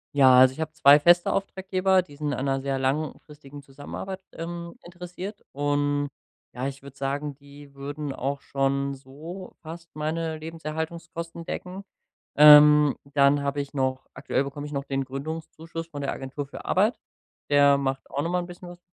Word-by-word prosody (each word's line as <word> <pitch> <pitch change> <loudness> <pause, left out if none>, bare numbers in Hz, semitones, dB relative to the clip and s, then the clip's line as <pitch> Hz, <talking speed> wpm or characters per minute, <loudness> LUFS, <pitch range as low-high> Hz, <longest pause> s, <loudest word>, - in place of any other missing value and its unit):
Ja, 130 -2 +7
also 130 0 +7
ich 155 - -14
hab 155 0 -4
2 145 -2 +7
feste 175 +3 +4
Auftraggeber, 190 -1 +1
die 145 -5 -15
sind 150 -1 -2
an 130 - -3
’ner 135 0 0
sehr 135 0 -1
langfristigen 145 +1 -4
Zusammenarbeit, 145 +8 -7
ähm, 170 +1 -6
interessiert, 180 +3 -8
und 145 0 0 0.5
ja, 130 +2 -3
ich 135 0 -7
würde 140 -1 -12
sagen, 140 +2 -3
die 140 0 -15
würden 145 +1 -5
auch 140 +2 -3
schon 140 0 -1
so 150 +8 -10
fast 165 +1 -9
meine 160 +1 -2
Lebenserhaltungskosten 165 +1 -6
decken. 185 +2 -6 0.5
Ähm, 150 -1 +8 0.2
dann 140 +1 +4
hab 140 0 -2
ich 140 0 -4
noch 130 -1 -1
aktuell 135 - -1
bekomme 145 +1 -6
ich - - -10
noch 140 - -2
den 135 0 -1
Gründungszuschuss 160 +4 -6
von 145 -3 -7
der 140 - -1
Agentur 135 +2 -6
für 140 - -10
Arbeit, 210 +6 +2 0.5
der 140 -1 +5
macht 135 -1 -2
auch 140 - -1
noch 165 - -2
mal 180 - +1
’n - - -7
bisschen 175 0 -10
was 175 0 -12
145 Hz, 170 wpm, -26 LUFS, 140-165 Hz, 0.5 s, Ähm